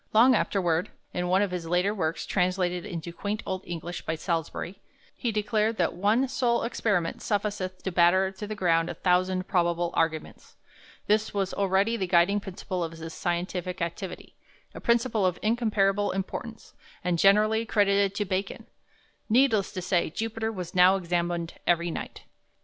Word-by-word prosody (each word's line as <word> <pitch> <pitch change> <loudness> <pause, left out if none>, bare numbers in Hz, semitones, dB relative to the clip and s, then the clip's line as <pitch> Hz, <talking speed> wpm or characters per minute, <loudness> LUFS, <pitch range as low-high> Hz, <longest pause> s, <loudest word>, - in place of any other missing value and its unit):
Long 240 +4 +7
afterward, 180 -6 +1 0.2
in 180 0 -1
one 190 +3 +3
of 200 - -2
his 175 -2 -4
later 180 +4 +1
works, 165 -5 -2
translated 180 0 0
into 170 -3 -6
quaint 205 +4 -3
old 190 -1 -3
English 170 0 -5
by 160 - -2
Salusbury, 170 +2 -3 0.3
he 240 - -2
declared 215 +1 0
that 170 - +1
"one 210 +8 +2
sole 245 -2 +1
experiment 200 -7 -1
sufficeth 200 -3 -2
to 190 - -2
batter 185 +2 +4
to 200 +2 -7
the 215 - -4
ground 165 -4 +2
a - - -5
thousand 185 0 +1
probable 175 -2 +1
Arguments." 160 -1 -2 0.5
This 215 0 +1
was 195 -2 -1
already 200 +3 +1
the 190 -4 -2
guiding 180 +3 +4
principle 185 -2 -4
of 165 0 -4
his 165 0 -8
scientific 180 0 -3
activity, 170 +3 -5 0.4
a - - -9
principle 235 -2 +2
of 180 -1 +1
incomparable 210 -3 +1
importance, 220 +4 -5 0.3
and 175 -1 0
generally 215 +4 +4
credited 200 -2 +2
to 205 - -1
Bacon. 190 +1 -3 0.6
Needless 225 -4 +3
to 185 - -4
say, 180 -2 +1
Jupiter 225 +4 -3
was 180 -5 -6
now 185 +1 +6
examined 175 -2 -2
every 170 0 +2
night. - - -7
190 Hz, 160 wpm, -27 LUFS, 175-210 Hz, 0.6 s, Long